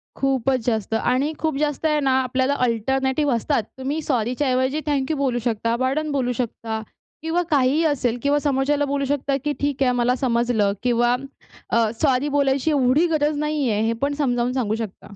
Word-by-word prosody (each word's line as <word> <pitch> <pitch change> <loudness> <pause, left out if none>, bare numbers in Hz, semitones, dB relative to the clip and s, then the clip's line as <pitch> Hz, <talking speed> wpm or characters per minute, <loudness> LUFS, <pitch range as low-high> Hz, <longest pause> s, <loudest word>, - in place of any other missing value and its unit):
खूपच 270 -1 +1
जास्त. 220 -3 -1
आणि 255 +7 +1
खूप 315 -3 -1
जास्त 295 +1 -1
आहे 305 -1 +2
ना, 270 -2 +1
आपल्याला 260 +2 0
अल्टरनेटिव्ह 265 +4 0
असतात. 235 +1 0
तुम्ही 275 +4 -3
सॉरीच्या 255 0 -1
ऐवजी 260 +3 +1
थँक 285 0 0
यू 310 - -1
बोलू 260 -3 0
शकता, 230 0 0
पार्डन 270 +5 -1
बोलू 260 -3 0
शकता 225 -2 -4 0.4
किंवा 325 +3 0
काहीही 285 +2 +3
असेल 255 -6 0
किंवा 285 +1 +2
समोरच्याला 285 0 +1
बोलू 280 0 -1
शकता, 280 0 0
की 295 - +1
"ठीक 285 -1 0
आहे, 255 - +3
मला 245 0 +1
समजलं" 235 -5 +1
किंवा 240 0 +2 0.5
अ, 230 -1 +2
सॉरी 275 -1 +2
बोलायची 280 +1 +1
एवढी 280 +3 +3
गरज 300 -2 0
नाहीये, 290 -7 0
हे 230 - +1
पण 280 +1 +1
समजावून 250 -4 0
सांगू 230 -5 0
शकता. 210 -2 -7
265 Hz, 175 wpm, -22 LUFS, 245-290 Hz, 0.5 s, काहीही